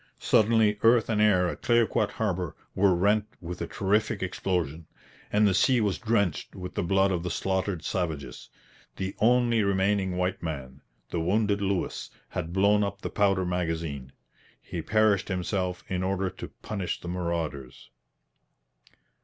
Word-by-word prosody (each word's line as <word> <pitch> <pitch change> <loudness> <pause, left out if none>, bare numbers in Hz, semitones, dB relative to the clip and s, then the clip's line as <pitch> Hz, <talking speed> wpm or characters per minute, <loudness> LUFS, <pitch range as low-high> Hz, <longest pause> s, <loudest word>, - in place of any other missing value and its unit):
Suddenly 110 -1 +3
earth 115 0 +4
and 105 -2 +1
air 95 -4 +4
at - - -5
Clayoquot 115 -3 +2
harbour 90 -7 -2 0.2
were 95 -1 +3
rent 105 +4 +2
with 90 0 -7
a - - -2
terrific 105 +1 0
explosion, 85 -4 -2 0.4
and 105 0 +4
the 100 - +2
sea 125 +6 +4
was 105 -4 0
drenched 105 - 0
with 90 -1 -7
the - - -1
blood 95 +2 +2
of 90 -2 -1
the 90 - -3
slaughtered 95 -1 -2
savages. 80 -7 -3 0.5
The 95 0 -4
only 120 0 +3
remaining 95 -1 +1
white 90 +1 -1
man, 70 -5 -6 0.3
the 85 - -1
wounded 100 +4 +1
Lewis, 95 -2 -2 0.2
had 80 - -4
blown 100 +3 +3
up 100 0 -4
the - - -3
powder 95 -3 +2
magazine. 80 -6 -3 0.5
He 85 - -6
perished 105 +2 +2
himself 90 -1 -2
in 90 -1 -2
order 95 0 -1
to - - -8 0.2
punish 100 -4 -3
the - - -9
marauders. 85 -7 -4
95 Hz, 150 wpm, -27 LUFS, 90-105 Hz, 0.5 s, earth